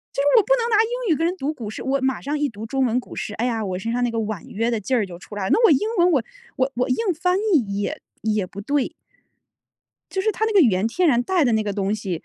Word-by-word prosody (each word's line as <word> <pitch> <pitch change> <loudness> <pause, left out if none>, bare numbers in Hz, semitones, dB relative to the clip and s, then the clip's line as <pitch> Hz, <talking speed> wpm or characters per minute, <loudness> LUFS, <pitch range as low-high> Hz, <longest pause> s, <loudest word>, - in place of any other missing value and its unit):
就 275 - +1
是 285 - +1
我 430 - +6
不 - - +2
能 470 -1 -1
拿 430 - +4
英 475 -4 0
语 - - -1
跟 330 - +1
人 360 - -2
读 300 -3 -3
古 225 -8 -7
诗， - - -7
我 270 +1 0
马 265 0 -1
上 290 +2 -2
一 295 - +1
读 215 -2 -8
中 265 +3 0
文 240 +1 +1
古 - - -13
诗， 210 - -4
哎 235 - -2
呀， 225 -3 -1
我 185 -2 -3
身 225 +5 -3
上 245 +1 -1
那 245 - +2
个 230 - -4
婉 215 -4 -4
约 230 +3 -1
的 230 - 0
劲 255 +6 -1
儿 220 - +2
就 175 -2 -10
出 205 - -11
来 200 - -3
了。 190 - -1
那 460 - +3
我 - - +6
英 265 - +5 0.2
文 350 +1 +5
我 275 -9 +2 0.3
我 260 +1 0
我 250 +1 0
硬 255 - 0 0.2
翻 360 +1 +2 0.2
译 210 -10 +1
也 - - -3 0.2
也 215 -4 0
不 200 +3 -8
对。 280 +4 0 1.2
就 380 - -1
是 435 - +1
它 440 +3 -1
那 445 - -1
个 400 - +6
语 245 - +6
言 190 +3 +1
天 350 +8 +1
然 245 -4 +4
带 360 -1 +2
的 240 - +2
那 220 0 +2
个 205 -1 -2
东 200 +1 -1
西， 190 -6 -4
245 Hz, 330 characters per minute, -22 LUFS, 210-315 Hz, 1.2 s, 我